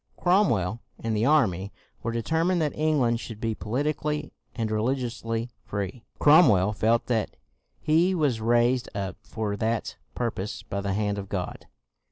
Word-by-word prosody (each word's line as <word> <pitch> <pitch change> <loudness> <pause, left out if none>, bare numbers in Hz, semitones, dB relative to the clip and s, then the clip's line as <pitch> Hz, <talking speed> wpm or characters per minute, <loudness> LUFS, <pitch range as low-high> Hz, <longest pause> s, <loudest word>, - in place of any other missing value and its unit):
Cromwell 120 - +2 0.2
and 115 -1 -2
the 110 +4 +2
army 100 - +2 0.3
were 115 - -2
determined 160 +10 +1
that 150 -3 0
England 140 -7 +2
should 115 -3 -8
be 115 -1 -1
po 105 - -9
litically 150 +3 -1 0.2
and 115 -3 -2
religiously 115 0 -1
free. 100 +4 -5
Cromwell 125 - +6
felt 115 +2 +2
that 115 -4 -1 0.4
he 170 +5 +3
was 140 -9 +1
raised 120 +2 +2
up 100 -1 -3
for 105 -2 -3
that 110 0 -1 0.2
pur 120 -2 0
pose 100 +1 -5
by 100 - -4
the 100 -1 -1
hand 105 0 -1
of 100 -1 -7
God. 90 -3 -4
115 Hz, 155 wpm, -26 LUFS, 105-145 Hz, 0.4 s, Cromwell